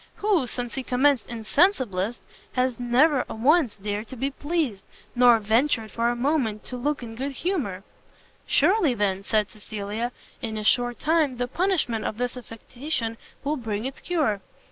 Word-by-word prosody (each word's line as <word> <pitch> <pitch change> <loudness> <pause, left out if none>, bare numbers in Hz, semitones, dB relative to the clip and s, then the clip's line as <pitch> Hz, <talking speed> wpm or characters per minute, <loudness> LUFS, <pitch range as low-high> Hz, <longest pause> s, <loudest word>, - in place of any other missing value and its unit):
who, 395 -11 +1
since 245 -1 -4
he 270 - -2
commenced 255 -1 +2
INSENSIBLIST, 235 - +1 0.3
has 255 -1 0
never 255 +4 +3
once 265 +2 +3
dared 205 +2 -4
to 260 - -8
be 270 +3 -2
pleased, 290 - -2 0.3
nor 245 -1 +6
ventured 225 +1 +1
for 235 +1 +1
a 240 - 0
moment 240 -5 0
to 255 - -5
look 280 +2 -1
in 225 -1 -7
good 270 +4 -4
humour!" 260 - -2 0.6
"Surely, 330 - +3
then," 195 -2 0
said 210 0 0
Cecilia, 215 +2 -4 0.3
"in 220 -2 -3
a 215 - -3
short 245 +2 +3
time, 305 -5 +2
the 245 0 -1
punishment 310 - 0
of 215 - -3
this 245 +1 -2
affectation 240 +1 -4 0.3
will 295 +2 0
bring 220 -3 -3
its 265 0 -5
cure." 285 - 0
245 Hz, 160 wpm, -25 LUFS, 220-285 Hz, 0.6 s, nor